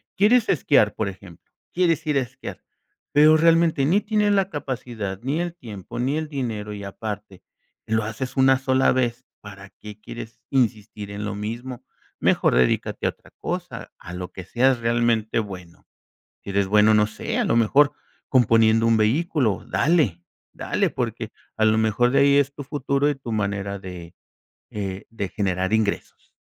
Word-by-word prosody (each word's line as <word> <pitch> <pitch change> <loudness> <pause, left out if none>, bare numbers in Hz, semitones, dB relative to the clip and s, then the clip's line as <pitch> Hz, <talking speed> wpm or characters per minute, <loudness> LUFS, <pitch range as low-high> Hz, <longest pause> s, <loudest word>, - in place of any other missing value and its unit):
Quieres 220 +3 +4
esquiar, 110 - +3
por 110 -3 -1
ejemplo, 95 -3 -14 0.2
quieres 165 -3 +1
ir 150 -2 +2
a - - +3
esquiar, 125 - -8 0.5
pero 155 +2 +6
realmente 165 -2 +3
ni 185 +7 +3
tienes 210 -1 +1
la 195 -1 +2
capacidad, 120 - -5
ni 145 +6 -1
el 175 -1 -3
tiempo, 110 - -9
ni 135 +5 0
el 155 -1 -4
dinero, 110 -7 -4
y 100 - -7
aparte 105 -2 -7 0.4
lo 110 0 0
haces 125 +5 -5
1 130 0 +5
sola 130 0 +2
vez, 125 0 -1 0.2
¿para 100 -1 -11
qué 105 0 -12
quieres 115 +1 -9
insistir 110 -5 -1
en 105 +1 -5
lo 105 -1 -4
mismo? 120 +4 -6 0.4
Mejor - - +2
dedícate 60 0 +1
a - - +2
otra - - -13
cosa, - - -5
a 85 - -10
lo 90 0 -6
que 95 - -9
seas 125 +4 +2
realmente 115 -1 +1
bueno. 90 -5 -8 0.6
Sí - - -7
eres 100 0 +1
bueno, 105 +2 +5
no 105 0 +4
sé, 110 - -4
a - - +2
lo - - +1
mejor 135 +6 +4 0.4
componiendo 115 -2 +4
un 115 - +4
vehículo, 120 - +1
dale, 130 - +1 0.3
dale, - - -1
porque - - -4 0.3
a 110 - +2
lo 110 0 +3
mejor 110 +3 +2
de 135 - +3
ahí 140 0 +5
es 140 0 +1
tu 145 - -7
futuro 140 0 0
y - - -1
tu 130 -3 -9
manera 100 -1 -2
de, 90 -3 -9 0.6
eh, 95 -2 -5
de 115 -3 -4
generar 95 0 -1
ingresos. 110 -2 -2
115 Hz, 170 wpm, -23 LUFS, 105-140 Hz, 0.6 s, pero